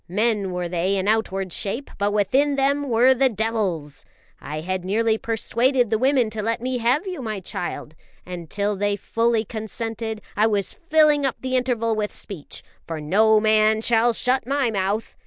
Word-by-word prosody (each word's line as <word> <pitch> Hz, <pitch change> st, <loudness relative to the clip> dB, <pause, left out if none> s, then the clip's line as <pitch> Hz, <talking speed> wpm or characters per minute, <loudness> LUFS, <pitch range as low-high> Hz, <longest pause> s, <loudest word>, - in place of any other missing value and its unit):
Men 210 Hz, 0 st, 0 dB
were 180 Hz, -1 st, -2 dB
they 180 Hz, +3 st, 0 dB
in 195 Hz, 0 st, -1 dB
outward 195 Hz, -4 st, 0 dB
shape, 230 Hz, +8 st, -4 dB
but 205 Hz, 0 st, +1 dB
within 265 Hz, +8 st, +2 dB
them 280 Hz, +1 st, +1 dB
were 245 Hz, +3 st, +5 dB
the 260 Hz, +1 st, +3 dB
devils. 205 Hz, -, -2 dB, 0.4 s
I 155 Hz, +1 st, -6 dB
had 185 Hz, +2 st, -3 dB
nearly 220 Hz, +3 st, +1 dB
persuaded 235 Hz, +2 st, +1 dB
the 220 Hz, -, +2 dB
women 255 Hz, -3 st, +2 dB
to 215 Hz, 0 st, -3 dB
let 230 Hz, +2 st, -1 dB
me 250 Hz, +1 st, -2 dB
have 250 Hz, -, +1 dB
you, 365 Hz, -6 st, -5 dB
my 215 Hz, -4 st, -4 dB
child; 175 Hz, -4 st, -5 dB, 0.3 s
and 175 Hz, -3 st, -7 dB
till 205 Hz, 0 st, -1 dB
they 205 Hz, +1 st, 0 dB
fully 230 Hz, +2 st, 0 dB
consented, 220 Hz, 0 st, -5 dB
I 215 Hz, +2 st, +3 dB
was 205 Hz, -3 st, 0 dB
filling 305 Hz, -3 st, +3 dB
up 270 Hz, -, 0 dB
the 260 Hz, 0 st, -2 dB
interval 240 Hz, -3 st, 0 dB
with 210 Hz, -1 st, -2 dB
speech, 180 Hz, -8 st, -7 dB, 0.2 s
for 165 Hz, -1 st, -4 dB
no 215 Hz, +8 st, +4 dB
man 215 Hz, 0 st, +3 dB
shall 235 Hz, +1 st, +3 dB
shut 250 Hz, +2 st, 0 dB
my 275 Hz, -3 st, +1 dB
mouth. 200 Hz, +2 st, -2 dB
220 Hz, 175 wpm, -23 LUFS, 200-245 Hz, 0.4 s, were